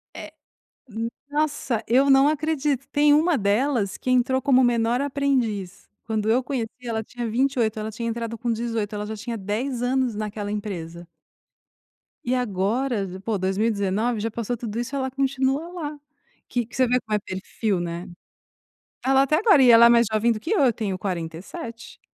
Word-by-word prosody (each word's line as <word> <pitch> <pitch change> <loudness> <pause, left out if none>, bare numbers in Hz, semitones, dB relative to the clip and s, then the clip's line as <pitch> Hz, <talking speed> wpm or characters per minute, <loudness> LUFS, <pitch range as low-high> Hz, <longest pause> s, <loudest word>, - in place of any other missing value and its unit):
É. - - -8 0.6
N 225 +1 -3 0.2
nossa, 290 -6 -1
eu 270 +4 +4
não 270 +1 +6
acredito. 295 -3 -1
Tem 290 0 +4
uma 315 0 +3
delas 210 0 +1
que 255 - -3
entrou 255 +1 +2
como 260 -2 +4
menor 235 0 +2
aprendiz, 260 -9 -1 0.2
quando 220 -2 -2
eu 245 +4 +3
conheci, 250 -4 -3
ela 225 -2 -3
tinha 240 -1 -5
28, 240 -3 +1
ela 215 0 -3
tinha 230 +1 -4
entrado 230 0 -3
com 235 +1 -2
18, 225 -2 -2
ela 210 0 -4
já 220 - -5
tinha 230 +2 -5
10 235 +6 -3
anos 255 -1 +1
naquela 210 -1 -4
empresa 175 -5 -5 1.2
e 250 +1 0
agora, 220 0 0 0.2
pô, 220 -3 -1
2019, 205 +3 0
já 225 +1 -2
passou 235 +2 -3
tudo 230 -1 -5
isso 240 +4 -4
e - - -1
ela 265 -1 -1
continua 270 +3 0
lá, 300 -4 -5 0.5
que 240 -3 -1
que - - -18
você 255 -1 +4
vê 250 +1 +2
como 215 -2 -4
é - - 0
perfil, 190 0 -3
né. 170 0 -4 0.9
Está 265 - 0
lá 270 0 +6
até 305 +3 +2
agora, 400 - +5
e 250 - +6
ela 230 0 +9
é - - +5
mais 235 -2 +5
jovem 220 +2 +2
do 215 - -2
que 320 - -5
eu, 430 - +3
eu 250 -4 +4
tenho 200 -4 -3
47, 185 +5 -6
235 Hz, 180 wpm, -24 LUFS, 210-265 Hz, 1.2 s, ela